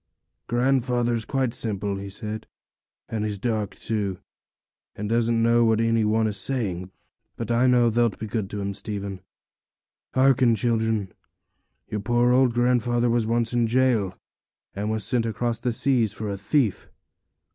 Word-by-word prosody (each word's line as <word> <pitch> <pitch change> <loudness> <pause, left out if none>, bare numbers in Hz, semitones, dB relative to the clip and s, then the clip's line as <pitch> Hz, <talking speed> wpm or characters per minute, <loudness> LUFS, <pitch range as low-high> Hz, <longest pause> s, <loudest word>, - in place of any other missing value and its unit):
'Grandfather's 120 -2 +1
quite 130 -4 -1
simple,' 100 -2 -2
he 100 0 -6
said, 105 +2 -6 0.6
'and 110 -2 -3
he's 105 -1 -2
dark, 110 -2 -2
too, 105 -4 -2 0.8
and 105 - -4
doesn't 115 0 +1
know 120 +1 +4
what 110 -1 +3
any 115 -1 +2
one 110 +1 +2
is 105 -2 -2
saying. 95 -5 -1 0.5
But 115 0 -4
I 120 +2 +3
know 120 -2 +4
thee'lt 115 -2 +1
be 110 - -5
good 105 -2 -3
to 105 -1 -4
him, 100 0 -3
Stephen. 100 -1 -5 1.0
Hearken, 130 -3 +4
children: 110 -3 0 0.7
your 105 - -3
poor 120 +3 +2
old 130 0 +4
grandfather 120 -1 +2
was 115 -2 +1
once 115 0 0
in 120 -1 +2
jail, 115 -6 +1 0.6
and 105 +2 -3
was 110 -1 -1
sent 115 +2 +1
across 115 +1 -2
the 125 0 -1
seas, 115 -3 +1
for 105 0 -4
a - - -2
thief.' 110 - 0
115 Hz, 155 wpm, -25 LUFS, 105-120 Hz, 1.0 s, know